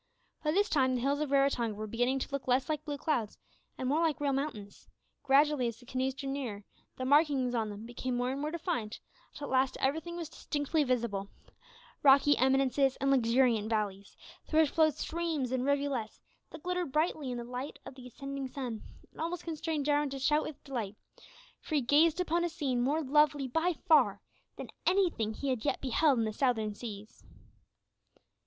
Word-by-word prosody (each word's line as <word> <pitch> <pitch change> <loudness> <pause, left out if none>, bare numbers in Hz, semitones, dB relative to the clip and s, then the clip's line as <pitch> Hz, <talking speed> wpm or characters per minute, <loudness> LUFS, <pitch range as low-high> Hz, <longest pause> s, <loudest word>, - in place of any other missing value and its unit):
By 300 - 0
this 405 +5 +3
time 260 -6 +2
the 245 - -1
hills 280 +3 +1
of 300 -2 -1
Raratonga 275 -5 +2
were 215 +1 -5
beginning 245 +5 0
to 265 - -3
look 280 -1 -4
less 255 +1 +2
like 305 -1 -1
blue 290 -2 -3
clouds 255 -8 -1 0.4
and 255 - -3
more 300 +5 +2
like 320 -3 +1
real 285 -1 0
mountains; 265 -8 -5 0.3
gradually 280 -1 +3
as 230 -1 -4
the 245 - -17
canoes 260 +1 -2
drew 275 0 -6
nearer, 255 -7 -4 0.3
the 255 - -3
markings 280 -3 +3
on 225 -3 0
them 205 +2 -8
became 245 +1 -4
more 245 +1 0
and 275 +1 -4
more 300 - -1
defined, 320 - -3 0.3
until 290 - -7
at - - -7
last 260 0 +2
everything 320 +5 -1
was 335 -2 -4
distinctly 300 0 -1
visible 235 -7 -1 0.7
rocky 280 +1 +6
eminences 270 +1 +3
and 275 0 0
luxuriant 235 -3 +3
valleys, 200 -3 -3 0.3
through 315 0 +4
which 305 - +2
flowed 310 -3 +3
streams 315 -5 -2
and 260 0 0
rivulets 280 -5 -1 0.3
that 320 - -11
glittered 360 -4 -2
brightly 305 -2 0
in 245 - -3
the 240 - -4
light 250 +4 -6
of - - -8
the 255 -1 -11
ascending 275 +2 -6
sun, 250 -5 -5 0.3
and - - -10
almost 335 +1 -3
constrained 320 -3 -3
Jarwin 295 0 +2
to 275 - -5
shout 300 +3 +2
with 310 - -7
delight, 230 -7 -4 0.6
for 310 - -4
he 290 - +3
gazed 305 +6 +4
upon 345 -1 +1
a 345 - 0
scene 280 -7 -1
more 295 +6 +1
lovely 290 0 +3
by 325 +7 +1
far 245 -11 +5 0.4
than - - -7 0.2
anything 340 - +2
that - - -13
he 280 - -1
had 255 -4 -1
yet 290 - 0
beheld 270 +2 +2
in 225 - +1
the 215 - -3
Southern 220 -4 0
Seas. 210 -1 -9
270 Hz, 195 wpm, -31 LUFS, 245-300 Hz, 0.7 s, rocky